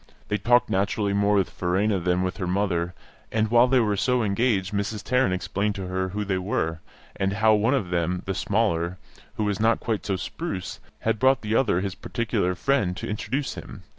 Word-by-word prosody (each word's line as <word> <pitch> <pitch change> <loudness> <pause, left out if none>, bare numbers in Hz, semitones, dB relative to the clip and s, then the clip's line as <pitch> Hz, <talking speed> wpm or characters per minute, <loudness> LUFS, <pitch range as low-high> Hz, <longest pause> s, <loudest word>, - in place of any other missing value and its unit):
They 105 - 0
talked 120 +4 +4
naturally 100 +1 0
more 100 +1 +3
with 95 -3 +1
Verena 95 +3 0
than 90 +1 +1
with 95 0 -2
her 90 - -3
mother; 90 -2 0 0.4
and 110 -1 0
while 120 +1 +6
they 130 0 +4
were 105 -3 +2
so 125 +4 +1
engaged 100 -2 +1
Mrs. 100 +1 -2
Tarrant 125 -5 +2
explained 100 +3 -1
to 95 - -4
her 95 +1 -2
who 105 +3 -3
they 95 -2 0
were, 80 -4 -1 0.4
and 95 0 0
how 110 +2 +4
one 110 +6 +3
of 100 -10 -2
them, 90 +1 0
the 95 - -1
smaller, 90 -4 0 0.4
who 110 - -1
was 105 -2 -1
not 115 +1 +3
quite 110 -4 -2
so 100 - -1
spruce, 95 - -5 0.2
had 115 -1 0
brought 130 0 +4
the 105 +1 -2
other, 105 -8 +2
his 100 -1 -2
particular 95 -4 -1
friend, 100 -5 +1
to - - -5
introduce 125 +6 -2
him. - - -10
100 Hz, 200 wpm, -25 LUFS, 95-115 Hz, 0.4 s, while